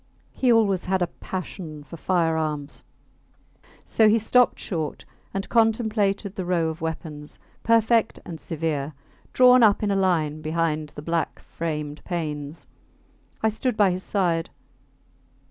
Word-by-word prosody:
He 255 -2 +2
always 200 -5 +3
had 190 -1 +1
a 170 - -4
passion 170 -5 -6
for 145 - -10
firearms; 160 -4 -1 1.0
so 220 -1 +4
he 220 - +5
stopped 245 +3 +3
short 160 -5 -4 0.3
and 195 0 -3
contemplated 220 -3 +1
the 190 - -4
row 175 -2 +1
of 160 0 -7
weapons, 155 -2 -5 0.2
perfect 230 0 +3
and 165 -2 -7
severe, 155 -3 -2 0.4
drawn 250 0 +7
up 215 -2 +5
in 205 - +1
a - - +2
line 160 -6 +1
behind 155 -1 -1
the 145 - -7
black 165 +1 -1
framed 150 -2 -5
panes. 150 -3 -4 0.8
I 220 - +4
stood 220 +2 -2
by 200 -3 +5
his 180 +1 -3
side. 175 -5 0
175 Hz, 135 wpm, -24 LUFS, 155-210 Hz, 1.0 s, drawn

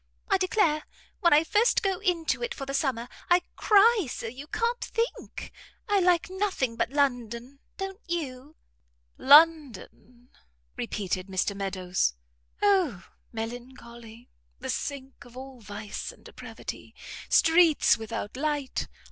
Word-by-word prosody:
I 390 - +4
declare, 365 -5 +1 0.3
when 345 -4 +3
I 300 +2 +6
first 425 +8 +2
go 385 -2 0
into 360 -3 0
it 485 0 -3
for 275 - -6
the 275 - -5
summer, 260 -4 -1 0.2
I 355 0 +4
cry 425 - +4
so - - -6
you 255 +6 -7
can't 470 +7 -1
think. 460 0 -4 0.4
I 410 -2 +3
like 355 -1 +3
nothing 375 - -1
but 230 - -1
London. 250 -2 -1 0.2
Don't 385 +2 -6
you?" 295 -4 -5 0.6
"London!" 265 - +3 0.5
repeated 185 - -3
Mr 190 +1 -1
Meadows, 185 - -1 0.5
"O 365 - +2 0.3
melancholy! 235 0 -9 0.3
the - - -4
sink 270 -1 -5
of 245 +1 -15
all 265 -1 -9
vice 205 0 -6
and - - -21
depravity. - - -9 0.3
Streets 325 -2 +5
without 220 -1 -6
light! 290 -1 -2
275 Hz, 125 wpm, -27 LUFS, 235-355 Hz, 0.6 s, I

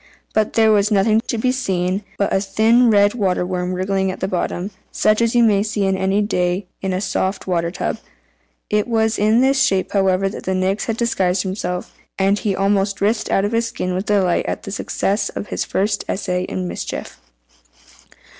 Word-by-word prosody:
But 215 -1 +1
there 220 -1 +4
was 205 -1 +3
nothing 215 +1 +3
to 235 - -1
be 250 +3 +1
seen 190 -6 -1
but 200 - 0
a - - +3
thin 225 +5 +3
red 205 -1 +4
water 190 -6 0
worm 180 0 -2
wriggling 190 +1 0
at 185 - -5
the 190 - -1
bottom, 185 +1 -2 0.2
such 215 +1 +2
as 230 0 +1
you 240 - +5
may 205 -3 +4
see 210 -1 -1
any 190 +1 +1
day 180 -1 0 0.2
in 190 - -2
a 185 - -1
soft 195 0 -2
water 170 -2 0
tub. 170 - -3 0.7
It 210 +1 0
was 225 -1 +1
in 215 +3 +4
this 270 +1 +3
shape, 195 -8 +1
however, 195 -1 +2
that 195 - -7
the 190 - 0
Nix 190 +2 0
had 225 -1 -2
disguised 190 -6 +1
himself, 180 -2 -4 0.2
and 195 +1 +2
he 205 -4 -1
almost 195 0 +1
writhed 215 +3 0
out 195 - +2
of 205 - -2
his 230 0 +1
skin 185 -4 -3
with 185 +3 -3
delight 190 -4 +2
at - - -3
the 200 - -7
success 200 +1 -1
of - - -6
his - - -2
first 200 +1 -1
essay 180 -2 -1
in 185 -1 -4
mischief. - - -6
200 Hz, 195 wpm, -20 LUFS, 185-215 Hz, 0.7 s, you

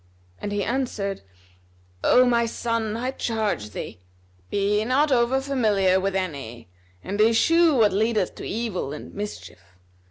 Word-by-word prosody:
and 205 - -4
he 205 -1 -1
answered, 220 -5 -2 0.8
"O 255 - +5
my 235 -1 +2
son, 225 -2 -2
I 250 +2 -2
charge 220 - -2
thee, 100 - -7 0.5
be 205 +1 +1
not 275 +6 +2
over 250 +1 +3
familiar 215 -9 +2
with 195 0 -1
any[FN#255] 140 -11 -4 0.4
and 205 +2 -2
eschew 305 +9 +4
what 215 -5 +4
leadeth 215 -1 +1
to - - -10
evil 205 -10 -3
and 150 - -9
mischief. 205 - -7
215 Hz, 135 wpm, -24 LUFS, 195-240 Hz, 0.8 s, O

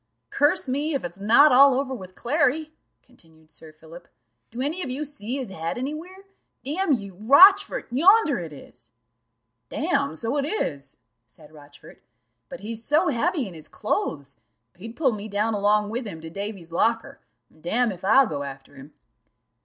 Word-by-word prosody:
"Curse 290 -1 +2
me, 285 +4 -2
if 275 - -3
it's 175 +2 -7
not 235 +9 +5
all 270 +1 +6
over 270 -1 -3
with 185 -6 -10
Clary," 300 +3 0 0.3
continued 160 -10 -20
Sir 155 +1 -14
Philip. 160 +2 -15 0.4
"Do 235 - -9
any 300 +8 -1
of 275 - -3
you 275 +4 -3
see 270 -3 -5
his 255 -7 -6
head 165 +1 -4
any 265 +4 -3
where? 365 +5 -10 0.4
Damn 315 +3 0
you, 200 -6 -4
Rochfort, 380 - +6
yonder 335 - +4
it 165 -3 -7
is." 145 - -14 0.8
"Damme, - - -1
so 230 - -3
it 285 - 0
is," 145 - -4 0.3
said 150 +7 -19
Rochfort; 145 -1 -16 0.5
"but 265 - -9
he's 225 +2 -6
so 315 +7 +2
heavy 285 - -1
in 185 - -10
his 155 -2 -9
clothes, 140 -3 -4 0.4
he'd 225 +6 -10
pull 280 -5 +2
me 210 -1 -6
down 215 +2 -1
along 210 0 +1
with 240 0 -4
him 165 -5 -8
to 160 0 -9
Davy's 195 -3 -7
locker: 225 +6 -1 0.3
damme, 220 +9 -1
if 180 -1 -11
I'll 240 +8 +5
go 145 - -4
after 135 -1 -9
him." 140 +2 -14
225 Hz, 170 wpm, -24 LUFS, 170-280 Hz, 0.8 s, all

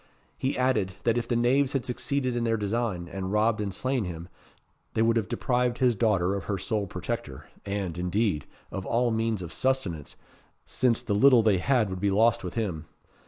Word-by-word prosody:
He 130 - -2
added, 110 -7 +1
that 115 -1 +2
if 120 - -5
the 120 - 0
knaves 130 +4 +2
had 135 -3 -1
succeeded 130 0 -1
in 120 - 0
their 115 -1 +1
design, 105 -4 -2
and 95 +1 -5
robbed 105 +1 +2
and 100 -1 -2
slain 130 +5 -1
him, 85 0 -7 0.7
they 110 - +3
would 115 0 +3
have 110 -3 0
deprived 125 0 0
his 125 -2 +3
daughter 100 -4 +2
of 100 -3 -4
her 100 +2 -1
sole 100 +2 -2
protector; 90 - -5 0.2
and, 100 -4 -2
indeed, 90 -3 0 0.2
of 95 - -4
all 120 +4 +1
means 110 -3 -1
of 85 - -6
subsistence, 110 - -1 0.5
since 120 -3 +1
the 105 - -1
little 125 +2 +6
they 105 -4 +3
had 120 -2 +2
would 95 - -4
be 100 - +2
lost 115 +4 +3
with - - -6
him. 90 -9 -2
110 Hz, 195 wpm, -27 LUFS, 95-120 Hz, 0.7 s, little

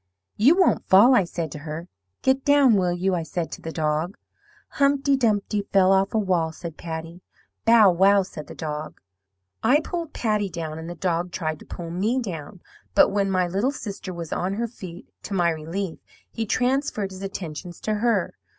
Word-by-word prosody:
"'You 265 +11 +5
won't 375 - +3
fall,' 210 +8 +7
I 200 -7 +4
said 170 -3 -4
to 150 - -7
her. 155 +3 -6 0.4
'Get 265 0 +2
down, 285 -4 +5
will 185 -3 +2
you?' 185 +2 0
I 175 - 0
said 165 +1 -4
to - - -7
the 165 - -5
dog. 155 +3 -1 0.5
"'Humpty 280 0 +2
Dumpty 210 -4 +1
fell 190 -1 +5
off 195 +2 +2
a - - +4
wall,' 180 -6 +1
said 165 0 -8
Patty. 165 +2 -7 0.4
"'Bow! 225 -4 +7
wow!' 195 +3 +4
said 165 -5 -9
the - - -10
dog. 155 -1 -5 0.6
"I 255 +7 +4
pulled 335 -1 -4
Patty 210 -3 0
down, 160 -2 -5
and 165 +1 -7
the 175 - -6
dog 175 -1 -1
tried 155 -3 -3
to - - -14
pull 170 -1 -7
me 210 +9 0
down; 180 - -6 0.3
but - - +6
when 200 -1 +1
my 185 -1 +2
little 195 +9 0
sister 205 -8 -6
was 170 -3 -5
on 190 +2 -1
her 235 +2 -1
feet, 185 -6 -10
to 200 - -5
my 175 -2 +3
relief, 165 +3 -4 0.3
he 225 -1 -3
transferred 250 -5 0
his 190 0 -9
attentions 175 -3 -6
to 215 - -1
her. 230 -6 +1
190 Hz, 190 wpm, -24 LUFS, 170-220 Hz, 0.6 s, fall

